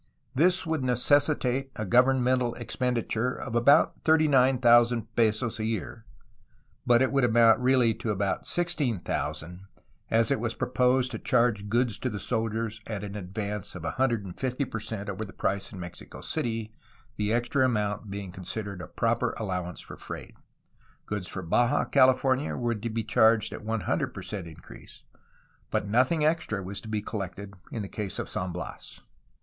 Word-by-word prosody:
This 180 +7 +3
would 160 -4 -1
necessitate 135 +1 +2
a 110 - -3
govern 125 +4 +4
mental 125 -1 +1
expenditure 125 0 -1
of 120 -3 -6
about 120 +5 +4
39,000 125 -6 +4
pesos 110 0 +1
a - - -2
year, 115 0 -4 0.8
but 120 +1 +5
it 130 - +1
would 135 -1 +2
amount 115 -1 +5
really 125 -2 +4
to 115 - -5
about 100 -1 -1
16,000, 115 - -2 0.4
at 115 +3 +3
it 140 - +2
was 115 0 -2
proposed 125 +1 +1
to - - -5
charge 115 -4 +1
goods 120 -2 +1
to - - -1
the 105 - -4
soldiers 110 +1 -2
at 105 -3 -4
an 100 0 -6
advance 100 +1 -5
of 90 - -7
150 125 - -1
per 115 - -5
cent 105 -2 -5
over 100 +2 -4
the 100 - -8
price 100 +1 -2
in 100 - -9
Mexico 90 -1 -9
City, 115 -2 -2 0.4
the 105 0 0
extra 120 +3 +1
amount 105 -4 0
being 100 -2 -6
con 95 0 -10
sidered 100 -1 -5
a - - -7
proper 115 +1 0
allowance 90 -4 -3
for - - -10
freight. - - -8 0.7
Goods 105 -3 -4
for 95 - -6
Baja 120 - +2
California 130 +1 +3
were 120 -1 0
to 115 +1 -4
be 115 0 -2
charged 110 +1 +3
at - - -8
100 110 -1 -1
per - - -6
cent 100 -5 -5
increase, 80 - -14 0.7
but - - -1
nothing 130 +9 +2
extra 155 - 0
was 95 +2 -6
to - - -11
be 105 -1 -2
collected 100 -1 -5 0.2
in 110 - -3
the - - -5
case 100 -2 -3
of - - -3
San 90 0 -2
Bias. 90 - -6
115 Hz, 165 wpm, -28 LUFS, 105-125 Hz, 0.8 s, but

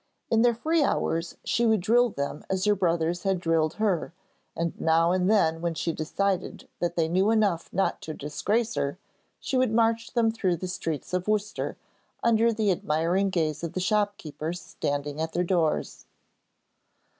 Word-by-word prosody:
In 225 -1 +4
their 240 -1 +4
free 315 +7 +1
hours, 165 - 0
she 235 - 0
would 220 -4 +3
drill 240 +5 +4
them 140 -5 -4
as 190 0 0
her 210 - +5
brothers 175 -2 0
had 195 -2 0
drilled 165 -2 +1
her, 195 -6 0 0.4
and 170 0 -1
now 165 +1 +3
and 185 +1 +2
then 165 -7 +3
when 170 -1 -1
she 165 +1 -1
decided 185 +4 -2
that 175 0 -1
they 165 -2 +2
knew 185 +5 +2
enough 205 -7 +1
not 195 +2 0
to 155 - -6
disgrace 210 +11 -1
her, 140 - -2 0.4
she 265 - -2
would 255 -3 +2
march 230 0 +1
them 230 -2 +3
through 190 -6 0
the 185 +3 -5
streets 165 -3 -4
of 180 +1 -1
Worcester, 210 0 -1 0.5
under 230 0 +4
the 215 -3 +1
admiring 175 +4 +1
gaze 155 -4 -1
of 170 - -4
the - - -2
shopkeepers 180 -5 -1
standing 145 -1 -3
at 160 0 -3
their 180 - +1
doors. 170 -3 -1
180 Hz, 170 wpm, -27 LUFS, 165-215 Hz, 0.5 s, her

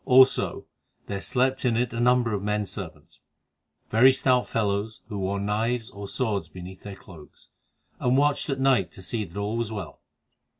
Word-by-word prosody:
Also, 130 0 +5 0.4
there 100 -1 -4
slept 130 +2 +1
in 120 -3 +2
it 120 -1 0
a 115 - -3
number 120 -1 +3
of 100 - -1
men 105 +1 0
servants, 90 -6 -9 0.7
very 125 +5 +7
stout 130 -1 +2
fellows, 105 0 -1
who 105 -3 -4
wore 95 +1 -1
knives 110 +4 -1
or 100 0 -8
swords 105 -8 -1
beneath 90 +3 -10
their 100 -1 -8
cloaks, 80 -5 -15 0.5
and 125 +1 +2
watched 145 +2 +2
at 135 -1 -1
night 130 -10 +3
to 95 - -11
see 110 +3 -2
that 90 +2 -12
all 105 +3 -2
was 115 -2 -2
well. 100 -6 -7
110 Hz, 175 wpm, -26 LUFS, 100-125 Hz, 0.7 s, very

